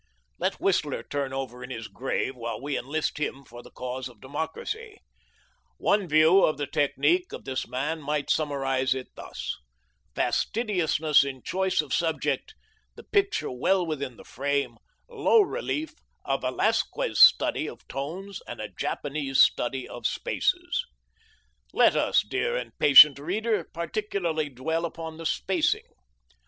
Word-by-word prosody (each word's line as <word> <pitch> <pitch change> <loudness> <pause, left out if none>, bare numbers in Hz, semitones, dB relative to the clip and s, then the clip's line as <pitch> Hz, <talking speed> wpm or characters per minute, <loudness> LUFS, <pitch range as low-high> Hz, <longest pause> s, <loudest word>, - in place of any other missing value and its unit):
Let - - -1
Whistler - - 0
turn 140 -2 -3
over 130 -2 -5
in 125 - -8
his 115 -3 -6
grave 130 +4 -3
while 115 -1 -5
we 140 +2 -3
enlist 150 +3 -2
him 140 -2 -3
for 120 0 -11
the - - -14
cause 125 +1 -5
of 120 -4 -18
democracy. 410 - -5 0.8
One 200 -2 +1
view 160 +5 +5
of 155 - +2
the 145 - -2
technique 155 - +1
of - - -8
this 130 -1 -3
man 145 +6 -3
might 150 0 -1
summarize 135 -3 0
it 130 -1 -6
thus: - - -6 0.6
fastidiousness 170 -10 +2
in 135 -2 -6
choice 190 -2 +1
of 145 -4 -6
subject, 165 -2 -1 0.4
the - - -12
picture 400 -1 0
well 180 +9 +1
within 140 -6 -4
the - - -13
frame, 140 +2 -2 0.3
low 460 -2 +4
relief, 385 -7 -2 0.3
a - - +1
Velasquez - - 0
study - - +6
of - - -13
tones 180 +8 -6
and 120 - -7
a 105 -1 -5
Japanese 140 - -2
study 130 +1 +3
of 120 -2 -3
spaces. - - -1 0.9
Let - - +5
us, - - +3
dear - - -1
and 120 -2 -5
patient 140 0 +9
reader, 200 +4 -1
particularly 170 -3 -2
dwell 160 +6 -2
upon 160 -1 -6
the 165 -1 -3
spacing. 180 -1 0
150 Hz, 145 wpm, -26 LUFS, 130-175 Hz, 0.9 s, patient